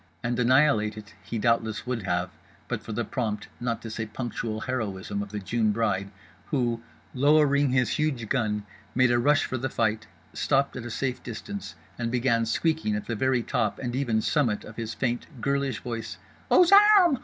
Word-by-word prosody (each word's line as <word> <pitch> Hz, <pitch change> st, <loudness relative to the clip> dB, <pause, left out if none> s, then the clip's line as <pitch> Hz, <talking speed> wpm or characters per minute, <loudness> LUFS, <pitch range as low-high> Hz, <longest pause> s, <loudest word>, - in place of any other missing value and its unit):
And 120 Hz, +1 st, -1 dB
annihilate 125 Hz, -4 st, +3 dB
it 105 Hz, 0 st, -10 dB
he 115 Hz, -, -4 dB
doubtless 115 Hz, 0 st, +1 dB
would 125 Hz, -2 st, -2 dB
have, 90 Hz, -1 st, -1 dB, 0.4 s
but -, -, -3 dB
for -, -, -8 dB
the 115 Hz, +2 st, -2 dB
prompt 105 Hz, -3 st, -3 dB
(not 120 Hz, -1 st, -2 dB
to 115 Hz, -, -6 dB
say 110 Hz, 0 st, -4 dB
punctual) 110 Hz, -1 st, -4 dB
heroism 100 Hz, -5 st, -3 dB
of 100 Hz, -, -6 dB
The 105 Hz, -, -5 dB
June 110 Hz, +2 st, 0 dB
Bride—who, 110 Hz, +4 st, -2 dB, 0.3 s
lowering 145 Hz, +1 st, +4 dB
his 125 Hz, -2 st, +2 dB
huge 140 Hz, -7 st, -1 dB
gun, 105 Hz, -4 st, 0 dB, 0.3 s
made 125 Hz, 0 st, +4 dB
a 120 Hz, -, +3 dB
rush 145 Hz, +4 st, +3 dB
for 130 Hz, -, -3 dB
the 130 Hz, +2 st, -2 dB
fight; 110 Hz, -1 st, 0 dB, 0.3 s
stopped 140 Hz, +1 st, +1 dB
at 125 Hz, -, -6 dB
a -, -, -5 dB
safe 125 Hz, +2 st, -2 dB
distance; 195 Hz, -, -7 dB, 0.2 s
and 115 Hz, -1 st, -1 dB
began 115 Hz, -2 st, +1 dB
squeaking 155 Hz, -3 st, 0 dB
at 105 Hz, -, -4 dB
the 115 Hz, -, -3 dB
very 130 Hz, +1 st, +1 dB
top 110 Hz, -3 st, 0 dB
and 120 Hz, -2 st, -4 dB
even 120 Hz, -5 st, +1 dB
summit 120 Hz, -6 st, +1 dB
of 105 Hz, -, -11 dB
his 115 Hz, -1 st, -4 dB
faint 120 Hz, -2 st, -1 dB
girlish 140 Hz, +1 st, -1 dB
voice: 115 Hz, -2 st, -5 dB, 0.3 s
"_Aux 355 Hz, 0 st, +6 dB, 0.3 s
armes! 345 Hz, -, +4 dB
120 Hz, 180 wpm, -27 LUFS, 110-130 Hz, 0.4 s, Aux